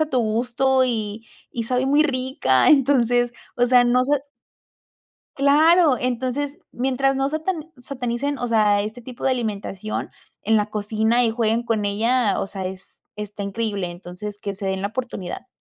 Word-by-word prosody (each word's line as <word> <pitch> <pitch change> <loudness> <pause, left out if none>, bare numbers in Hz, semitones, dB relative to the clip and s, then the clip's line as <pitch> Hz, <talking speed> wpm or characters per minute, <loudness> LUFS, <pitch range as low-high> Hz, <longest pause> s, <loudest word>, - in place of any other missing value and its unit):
a 310 - +2
tu 255 -2 +2
gusto 250 +4 +1
y 220 -2 -3 0.2
y 230 - -3
sabe 250 +3 0
muy 290 +2 +4
rica. 255 - +2
Entonces, 245 -4 +3 0.2
o 245 - +3
sea, 245 0 +6
no 250 +1 +3
sé. 285 +1 0 1.1
Claro. 300 +1 +5
Entonces 260 +5 -2
mientras 270 +2 0
no 270 0 +1
satan 315 +1 -3
satanicen, 260 +1 -3
o 245 - -2
sea, 210 -3 +3
este 220 +4 -6
tipo 245 +1 -9
de 265 - +3
alimentación 215 -4 -3 0.3
en 220 0 +3
la 210 - +2
cocina 220 +3 +1
y 225 - +2
jueguen 230 0 0
con 220 -3 0
ella, 225 +2 +1
o - - -2
sea, 195 -1 -5
es 190 +1 -9
está 210 -1 -6
increíble. 200 -2 -2
Entonces, 180 +4 -8
que 200 -1 -4
se 195 0 -5
den 190 0 -2
la 200 - 0
oportunidad. 230 -3 -5
240 Hz, 165 wpm, -22 LUFS, 210-265 Hz, 1.1 s, sea